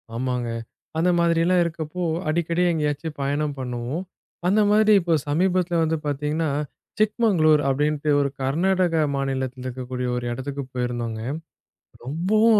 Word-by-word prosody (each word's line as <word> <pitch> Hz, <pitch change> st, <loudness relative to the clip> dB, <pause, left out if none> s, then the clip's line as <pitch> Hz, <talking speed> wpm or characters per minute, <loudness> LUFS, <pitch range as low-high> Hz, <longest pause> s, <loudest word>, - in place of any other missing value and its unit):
ஆமாங்க. 125 Hz, -1 st, -1 dB, 0.5 s
அந்த 175 Hz, +3 st, +3 dB
மாதிரி 170 Hz, -1 st, +3 dB
எல்லாம் 180 Hz, 0 st, +4 dB
இருக்கப்போ, 170 Hz, +1 st, -4 dB, 0.3 s
அடிக்கடி 170 Hz, +2 st, +1 dB
எங்கேயாச்சு 150 Hz, 0 st, -1 dB
பயணம் 145 Hz, +1 st, -1 dB
பண்ணுவோம். 125 Hz, +6 st, -3 dB, 0.4 s
அந்த 205 Hz, +4 st, +4 dB
மாதிரி 215 Hz, +1 st, +5 dB
இப்ப 170 Hz, -1 st, +2 dB
சமீபத்தில 175 Hz, +2 st, +1 dB
வந்து 160 Hz, 0 st, +1 dB
பார்த்தீங்கனா, 150 Hz, +2 st, -1 dB, 0.5 s
சிக்மங்களூர் 205 Hz, -9 st, +4 dB
அப்படின்ட்டு 150 Hz, +2 st, 0 dB
ஒரு 140 Hz, -, +1 dB
கர்நாடக 175 Hz, +5 st, +2 dB, 0.2 s
மாநிலத்தில் 130 Hz, -2 st, -2 dB
இருக்கக்கூடிய 125 Hz, 0 st, -4 dB
ஒரு 125 Hz, -, -3 dB
இடத்திற்குப் 135 Hz, +1 st, -5 dB
போயிருந்தோம்ங்க. 120 Hz, -3 st, -3 dB, 0.8 s
ரொம்பவும் 205 Hz, -, +3 dB
150 Hz, 120 wpm, -24 LUFS, 130-175 Hz, 0.8 s, மாதிரி